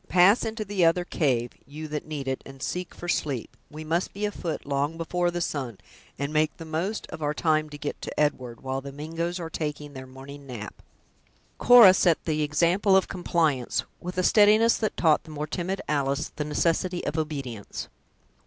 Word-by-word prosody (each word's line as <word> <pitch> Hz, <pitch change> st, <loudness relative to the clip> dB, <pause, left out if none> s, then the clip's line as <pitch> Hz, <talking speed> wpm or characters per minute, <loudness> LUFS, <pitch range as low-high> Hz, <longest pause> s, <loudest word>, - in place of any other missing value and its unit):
Pass 185 Hz, +5 st, +5 dB
into 220 Hz, -1 st, -3 dB
the 200 Hz, -2 st, 0 dB
other 170 Hz, +2 st, +3 dB
cave, 125 Hz, -9 st, 0 dB, 0.2 s
you 155 Hz, +3 st, -7 dB
that 150 Hz, 0 st, -4 dB
need 145 Hz, -3 st, -5 dB
it, 130 Hz, 0 st, -2 dB
and 135 Hz, -1 st, -10 dB
seek 180 Hz, 0 st, -4 dB
for 175 Hz, -, -8 dB
sleep; 140 Hz, -8 st, -2 dB
we 155 Hz, +1 st, -8 dB
must 165 Hz, +3 st, -1 dB
be 205 Hz, +1 st, -2 dB
afoot 175 Hz, -6 st, -4 dB
long 145 Hz, +3 st, -1 dB
before 175 Hz, +1 st, 0 dB
the 175 Hz, 0 st, -3 dB
sun, 130 Hz, -, -3 dB, 0.4 s
and 140 Hz, +2 st, -3 dB
make 155 Hz, 0 st, +1 dB
the 165 Hz, -, -8 dB
most 170 Hz, +7 st, -2 dB
of -, -, -7 dB
our 150 Hz, 0 st, -1 dB
time 155 Hz, -1 st, +1 dB
to 145 Hz, -, -8 dB
get 145 Hz, 0 st, -5 dB
to -, -, -5 dB
Edward, 130 Hz, -5 st, -1 dB
while 135 Hz, 0 st, -3 dB
the 140 Hz, +1 st, -8 dB
Mingoes 165 Hz, +5 st, -4 dB
are 165 Hz, -, -4 dB
taking 150 Hz, -2 st, -4 dB
their 130 Hz, -1 st, -8 dB
morning 140 Hz, +2 st, -11 dB
nap." 110 Hz, -5 st, -7 dB, 0.9 s
Cora 235 Hz, -6 st, +9 dB
set 175 Hz, -3 st, +2 dB
the 155 Hz, -2 st, 0 dB
example 175 Hz, +6 st, +3 dB
of 190 Hz, -, +1 dB
compliance, 160 Hz, -8 st, 0 dB, 0.2 s
with 180 Hz, +1 st, -6 dB
a 185 Hz, -, +2 dB
steadiness 215 Hz, +4 st, +5 dB
that 215 Hz, -, -2 dB
taught 160 Hz, -3 st, +3 dB
the -, -, -15 dB
more 150 Hz, -1 st, -4 dB
timid 180 Hz, +5 st, -3 dB
Alice 140 Hz, -1 st, 0 dB
the 150 Hz, -, -3 dB
necessity 170 Hz, +4 st, 0 dB
of 145 Hz, -, -2 dB
obedience. 140 Hz, -9 st, -4 dB
155 Hz, 190 wpm, -26 LUFS, 140-175 Hz, 0.9 s, Cora